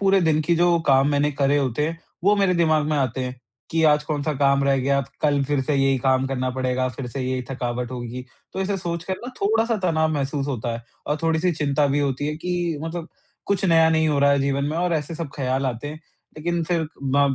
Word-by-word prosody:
पूरे 195 -1 +4
दिन 160 -2 +2
की 170 +2 +2
जो 175 0 +4
काम 135 0 +5
मैंने 145 +1 +2
करे 140 +1 +2
होते 135 +2 0
हैं, 165 +1 -4 0.3
वो 205 +1 +5
मेरे 195 -2 +2
दिमाग़ 155 -3 +3
में 155 -1 0
आते 130 -1 0
हैं 125 0 -5 0.3
कि 165 0 +1
आज 150 0 +3
कौन-सा 150 0 -1
काम 140 0 +3
रह 140 -1 +3
गया 140 +2 +2 0.2
कल 145 -2 +2
फ़िर 145 0 0
से 150 - 0
यही 135 -1 +2
काम 130 +1 +2
करना 130 -1 -1
पड़ेगा 130 0 -1
फ़िर 125 0 -6
से 135 +2 -5
यही 130 0 -1
थकावट 125 -1 -3
होगी। 125 0 -6 0.3
तो 190 - -4
ऐसे 195 +1 0
सोच 170 -2 -4
कर 190 - -2
ना - - -5
थोड़ा-सा 225 +3 +2
तनाव 160 -1 +2
महसूस 140 0 -2
होता 120 -4 -2
है 115 0 -6 0.2
और 150 - 0
थोड़ी-सी 165 +2 +2
चिंता 145 -1 +1
भी 140 +1 +1
होती 140 0 -1
है 150 - -2
कि 175 -2 -2
मतलब 165 +1 -5 0.4
कुछ 195 -1 0
नया 165 -2 +5
नहीं 160 -1 +3
हो 145 -2 +1
रहा 140 0 +5
है 140 - +3
जीवन 140 0 0
में 155 +3 -2
और 175 -1 +1
ऐसे 155 +1 -3
सब 160 -3 -5
ख़्याल 135 0 0
आते 125 +3 -3
हैं। 155 +1 -8 0.4
लेकिन 170 +2 -1
फिर 165 -2 0 0.2
ब 140 0 +2
145 Hz, 235 wpm, -23 LUFS, 135-165 Hz, 0.4 s, काम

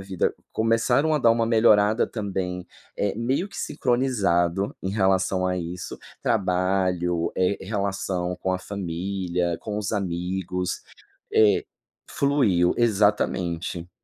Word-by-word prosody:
vida 95 -2 -1 0.2
começaram 115 +7 +2
a 150 - +2
dar 120 -3 +5
uma 115 0 +1
melhorada 110 -1 +4
também, 95 -4 -4 0.3
eh, 100 -1 0
meio 130 - -1
que 185 - -12
sincronizado 100 -7 0
em 95 - -2
relação 95 -2 +1
a 90 0 0
isso, 90 0 -5 0.2
trabalho, 90 -3 +1
eh, 95 +2 +2
r - - -8
relação 95 -3 -2
com 95 - -2
a 95 - -1
família, 90 -2 -2
com 105 -1 -4
os 105 0 -3
amigos, 90 -1 -2 0.5
eh 105 -2 +4 0.5
Fluiu. 115 -12 +2
Exatamente. 95 -6 +1
95 Hz, 120 wpm, -25 LUFS, 90-110 Hz, 0.5 s, dar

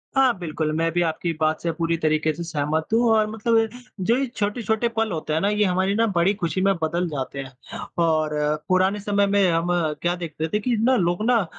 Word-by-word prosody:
हाँ 260 -5 +4
बिल्कुल, 155 -2 -2
मैं 165 0 +1
भी 175 - +1
आपकी 170 +1 -1
बात 155 0 +1
से 170 - -1
पूरी 165 0 -1
तरीके 155 0 +1
से 170 +3 -6
सहमत 155 -1 -2
हूँ 235 +2 +4
और 215 -1 +3
मतलब 225 +1 +1
ये 225 0 +3 0.4
जो 235 - +3
ये 275 - 0
छोटे-छोटे 220 +2 0
पल 220 -2 +1
होते 155 -2 -3
हैं 160 - +2
ना 200 - +2
ये 210 0 +2
हमारी 190 +2 +1
न 230 +1 +3
बड़ी 175 +4 +3
खुशी 185 -1 -2
में 195 0 +3
बदल 170 +3 0
जाते 140 -1 -4
हैं। 135 -1 -6 0.5
और 155 -1 +2 0.4
पुराने 190 +2 +2
समय 200 0 +1
में 200 -1 +3
हम 165 +1 0 0.3
क्या 175 +1 +1
देखते 160 -2 -4
थे 210 - +2
कि 240 +2 0
न 255 +4 +3
लोग 175 +4 0
न 230 -6 +3
180 Hz, 225 wpm, -23 LUFS, 160-210 Hz, 0.5 s, हाँ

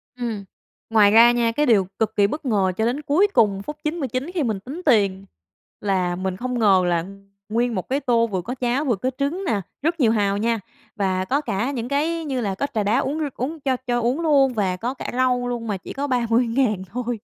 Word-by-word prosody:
Ừm, 230 -5 -4 0.5
ngoài 210 -2 +5
ra 230 +2 +8
nha, 235 -1 +1
cái 295 +6 +1
điều 205 -7 +3
cực 220 -1 0
kỳ 200 -1 +4
bất 300 +7 -5
ngờ 200 -6 +2
cho 220 - +1
đến 255 +5 -1
cuối 305 +8 +3
cùng 200 -3 +3
phút 300 +7 -6
99 295 -3 -2
khi 340 -5 0
mình 220 -6 -1
tính 270 - -8
tiền 200 -7 +2 0.6
là 185 -3 0
mình 185 0 -3
không 250 +2 -3
ngờ 195 -4 +5
là 170 -1 +1 0.4
nguyên 235 +2 0
một 185 - -4
cái 270 +2 +1
tô 235 -4 +2
vừa 190 -4 -2
có 245 +8 -5
cháo 255 +3 0
vừa 245 - +2
có 250 +7 -2
trứng 290 +8 -1
nè, 210 - 0 0.2
rất 325 +3 0
nhiều 235 -5 +4
hàu 200 -3 +1
nha, 230 +2 0 0.4
và 190 -3 0
có 275 +7 0
cả 240 -2 -2
những 240 -4 -4
cái 320 +4 0
như 265 -4 -2
là 200 -4 -2
có 280 - -1
trà 215 -3 0
đá 215 +6 +2
uống 285 +3 -2
r - - -1
uống 300 +6 -4
cho 265 -3 0
cho 240 0 +1
uống 250 +7 0
luôn 280 -5 +3
và 195 -5 0
có 240 +6 -3
cả - - -6
rau 250 -1 +1
luôn 240 -2 -4
mà 205 -3 -1
chỉ - - -9
có 285 +1 -3
30.000 235 -3 +1
thôi. 245 0 -3
240 Hz, 230 wpm, -22 LUFS, 205-270 Hz, 0.6 s, ra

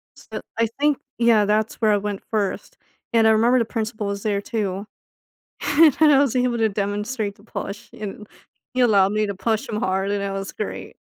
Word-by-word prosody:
So - - -8 0.2
I 230 - +3
think, 295 -1 +3 0.2
yeah, 230 -3 +4
that's 215 +1 +1
where 215 -1 +4
I - - +3
went 205 -1 -4
first 205 -3 -2 0.4
and 225 -1 +5
I - - +6
remember 235 +3 +4
the 230 - +1
principal 220 -2 -3
was 200 0 -4
there 200 -2 0
too. 200 -2 -3 0.8
and 290 0 +5
I 295 -3 +7
was 275 -3 +2
able 250 -1 +1
to 220 -1 +3
demonstrate 205 +2 -2
the 205 - -21
push 205 -2 -7
and 210 0 -7 0.5
he 255 - +1
allowed 200 -5 +4
me 215 0 +1
to 200 - -4
push 220 +2 -1
him 210 - -3
hard 190 +1 0
and 200 -1 -1
it 200 - -2
was 195 0 -4
great - - -6
215 Hz, 200 wpm, -22 LUFS, 200-235 Hz, 0.8 s, I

